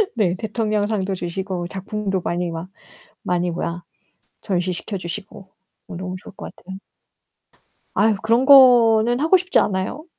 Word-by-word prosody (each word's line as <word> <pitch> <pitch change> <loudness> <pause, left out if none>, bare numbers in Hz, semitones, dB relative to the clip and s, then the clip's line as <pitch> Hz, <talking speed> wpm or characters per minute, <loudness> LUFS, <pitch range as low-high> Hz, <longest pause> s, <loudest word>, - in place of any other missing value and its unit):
네 190 -6 +1
대통령상도 210 -2 -2
주시고 180 0 -4
작품도 195 0 -4
많이 175 0 -2
막 165 +2 -7 0.5
많이 180 0 -1
뭐야 170 0 -4 0.6
전시 185 -3 -1
시켜주시고 190 +1 -7 0.4
너무 185 0 -6
좋을 - - -13
것 - - -9
같아요. 190 +1 -10 1.2
아유 215 0 +3
그런 230 +4 +2
거는 240 -4 +6
하고 325 +6 +4
싶지 365 +1 +1
않아요. 195 +10 -2
195 Hz, 275 characters per minute, -21 LUFS, 180-220 Hz, 1.2 s, 거는